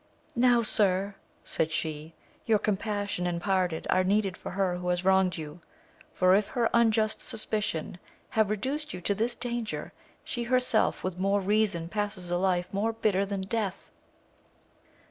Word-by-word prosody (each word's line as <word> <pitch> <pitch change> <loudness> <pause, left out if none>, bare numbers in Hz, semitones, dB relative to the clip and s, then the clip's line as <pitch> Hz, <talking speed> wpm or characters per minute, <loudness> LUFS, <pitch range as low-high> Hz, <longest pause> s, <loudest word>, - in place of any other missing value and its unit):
Now, 240 -1 +4
sir, 200 -2 +5 0.3
said 160 0 -1
she, 160 0 -4 0.3
your 220 -2 +4
compassion 205 -3 -2
and 170 -1 -2
pardon 185 -3 0
are 185 - +3
needed 195 0 +1
for - - -8
her 185 -1 -1
who 180 0 -6
has 180 +1 -1
wronged 190 -2 +3
you, 155 +2 -8 0.5
for, 185 0 +3
if 200 +1 +3
her 235 +1 0
unjust 220 -2 +2
suspicion 210 -6 -3 0.3
have 220 -2 +1
re 215 - 0
duced 290 +3 -3
you 180 - -8
to 200 - 0
this 230 +4 -1
danger, 240 -3 -4 0.3
she 240 -1 -4
herself 250 -2 +1
with 185 -1 -4
more 195 +2 +2
reason 200 -4 +1
passes 205 -2 -3
a 175 - +1
life 180 -1 0
more 215 +3 0
bitter 200 -3 0
than 200 -1 -3
death. 200 -1 -3
200 Hz, 160 wpm, -28 LUFS, 180-220 Hz, 0.5 s, sir